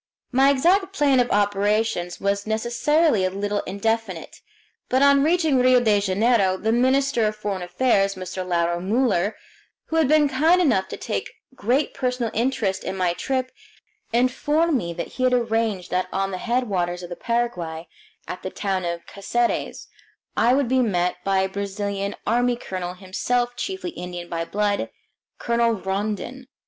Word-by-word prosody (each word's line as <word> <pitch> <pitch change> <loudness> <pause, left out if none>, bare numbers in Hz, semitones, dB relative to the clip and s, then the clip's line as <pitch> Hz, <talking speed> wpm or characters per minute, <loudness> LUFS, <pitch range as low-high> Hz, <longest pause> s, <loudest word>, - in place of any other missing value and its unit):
My 270 +2 +5
exact 370 +8 +2
plan 285 -7 +3
of 245 -1 +2
operations 205 -2 0
was 200 +1 -1
necessarily 235 - +2
a 185 - +2
little 205 +2 -2
indefinite, 200 -2 -3 0.5
but 260 +2 +3
on 280 0 +6
reaching 320 -4 +2
Rio 255 0 +5
de 215 -4 +3
Janeiro 200 0 +2
the 220 +3 0
minister 260 -1 +2
of 215 - -2
foreign 205 -3 -4
affairs, 195 +1 +1
Mr. 185 0 -5
Lauro 170 -1 0
Muller, 205 0 +1 0.5
who 325 - -2
had 320 -4 +4
been 300 0 +4
kind 315 +7 +3
enough 230 - +2
to - - -7
take - - -3 0.2
great 260 +4 0
personal 250 -4 -2
interest 225 -6 0
in 190 - -4
my 180 -2 +1
trip, 255 +6 -2 0.6
informed 295 +7 +1
me 170 -9 -1
that 170 0 -4
he 255 - -4
had 255 0 +3
arranged 225 -6 0
that 185 0 0
on 195 0 -1
the 185 - -4
headwaters 190 -8 -1
of 175 - -8
the - - -4
Paraguay, 175 -10 -2 0.4
at 180 - -6
the 185 - -4
town 190 -1 -2
of 170 0 -4
Caceres, 235 +4 -2 0.5
I 240 +3 +4
would 275 -2 +1
be 260 +2 +2
met 180 -6 0
by 195 -1 +2
a 190 - +1
Brazilian 200 0 -3
Army 245 +2 +2
colonel, 185 -6 -5
himself 240 +6 -1
chiefly 375 +6 -4
Indian 175 - -7
by 165 0 -2
blood, 205 +2 -1 0.5
Colonel 235 0 +1
Rondon. 210 +6 -4
220 Hz, 160 wpm, -23 LUFS, 190-255 Hz, 0.6 s, on